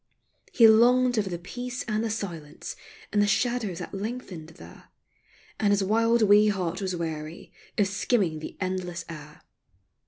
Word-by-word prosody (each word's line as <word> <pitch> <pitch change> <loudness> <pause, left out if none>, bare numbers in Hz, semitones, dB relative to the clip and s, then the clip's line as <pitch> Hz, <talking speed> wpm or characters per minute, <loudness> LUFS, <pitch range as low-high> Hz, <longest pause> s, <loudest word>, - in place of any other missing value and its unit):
He 230 -3 +7
longed 245 +3 +5
for 210 -4 0
the 175 - -3
peace 245 +9 -6
and 215 0 -1
the 230 - -1
silence 170 -9 -6 0.4
And 205 - +3
the 205 - +3
shadows 225 -4 0
that - - -7
lengthened 195 -6 -6
there, - - -13 0.7
And 205 -2 +2
his 200 -1 +2
wild 230 +3 +3
wee 210 +1 +6
heart 190 -2 -1
was 185 -2 -2
weary 160 -1 -6 0.3
Of 205 - +4
skimming 195 -5 0
the 155 - -8
endless 185 -2 -3
air. 150 -2 -11
205 Hz, 155 wpm, -26 LUFS, 175-225 Hz, 0.7 s, He